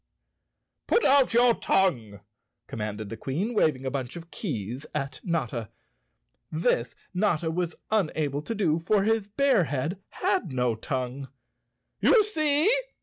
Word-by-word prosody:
" - - -56
"Put 470 - +3
out 275 -1 +5
your 240 +1 +5
tongue! 120 - 0 0.2
" 115 - -55
commanded 105 -1 -5
the 115 - -5
Queen, 190 - -2
wav¬ 155 -8 +3
ing 130 +1 -10
a 130 - -1
bunch 130 0 -4
of 170 0 -10
keys 125 - -4
at 140 -2 -3
Notta. 120 - -2 0.8
This 125 -7 0 0.2
Notta 175 -4 +1
was 175 0 -2 0.2
unable 155 -8 0
to 225 +9 -4
do, 170 -6 +1
for 195 +4 +2
his 220 -1 +1
bear 250 -3 +3
head 145 +8 -3
had 375 - -1
no 125 -2 +1
tongue. 130 +3 -4 0.7
"You 445 - +5
see!" 310 -5 +1
160 Hz, 145 wpm, -27 LUFS, 130-215 Hz, 0.8 s, out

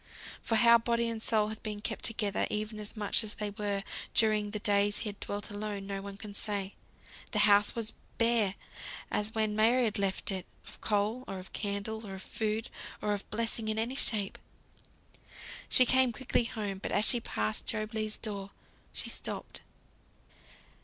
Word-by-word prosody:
For 225 - 0
how 235 +1 +7
body 235 0 +1
and 225 -1 -4
soul 215 -2 +2
had 220 0 -5
been 210 -1 -4
kept 220 +1 -3
together, 210 -3 +1
even 215 0 -2
as 210 +1 -5
much 210 +2 +1
as 215 - -6
they 210 -1 -3
were, 200 -1 -2 0.3
during 215 -2 +3
the 210 - -2
days 205 0 +2
he 220 - -2
had 200 -1 -7
dwelt 205 0 -4
alone, 205 -1 -4
no 195 0 -4
one 200 0 -8
can 205 0 -8
say. 200 -1 -2 0.6
The - - +2
house 205 0 +5
was 225 -1 0 0.2
bare 230 -4 +3 0.6
as 210 +1 -1
when 215 -1 +1
Mary 235 +4 +4
had 215 -3 0
left 195 0 0
it, 190 -2 -3 0.2
of - - -13
coal, 215 +4 +1
or 195 - -4
of 185 0 -10
candle, 205 +2 -2
of 190 -1 -7
food, 220 0 -2 0.3
or 210 - 0
of 205 - -5
blessing 225 0 -1
in 215 0 +1
any 235 +4 0
shape. 210 -7 0 1.3
She 255 - +7
came 260 0 +5
quickly 245 -1 0
home; 205 -4 -3
but - - -4
as 210 - +3
she 245 - +7
passed 105 - -2
Job 215 0 -2
Legh's 215 -1 -1
door, 200 -3 -5 0.4
she - - -2
stopped. - - -5
215 Hz, 180 wpm, -31 LUFS, 200-225 Hz, 1.3 s, how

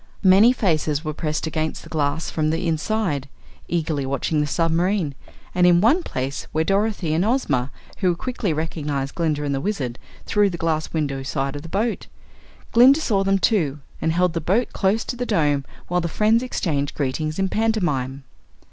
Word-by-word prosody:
Many 195 +5 +7
faces 155 - 0
were 155 - -2
pressed 155 0 -2
against 155 0 -3
the - - -12
glass 150 +1 -1
from 155 -1 0
the 165 +3 -1
inside, 160 -4 -1 0.4
eagerly 160 -4 -1
watching 140 +3 0
the 150 - 0
submarine, 165 +1 +1 0.4
and 180 0 +4
in 175 -1 +6
one 240 - +4
place 135 - -4
were 160 0 +1
Dorothy 195 -3 0
and 165 +3 +2
Ozma, 155 - +1 0.3
who 180 -3 +2
quickly 235 -1 -2
recognized 150 -3 -3
Glinda 155 -3 -1
and 140 -1 -1
the 135 - -1
Wizard 135 - -3 0.3
through 205 -1 +3
the 175 - -5
glass 160 -2 -1
windows 140 -4 -2
of 140 +1 -2
the 165 - -10
boat. 220 +6 -1 0.6
Glinda 260 +5 +7
saw 205 -10 +1
them, 195 0 +2
too, 175 - +1 0.2
and 160 - +1
held 175 +1 +2
the 165 - -2
boat 200 +10 0
close 205 +3 +1
to - - -4
the 245 - -3
Dome 145 -3 +1 0.2
while 180 0 0
the 170 - -1
friends 215 +6 +2
exchanged 150 - -2
greetings 155 +3 -2
in 195 0 +1
pantomime. 175 - -1
165 Hz, 175 wpm, -22 LUFS, 145-195 Hz, 0.6 s, Many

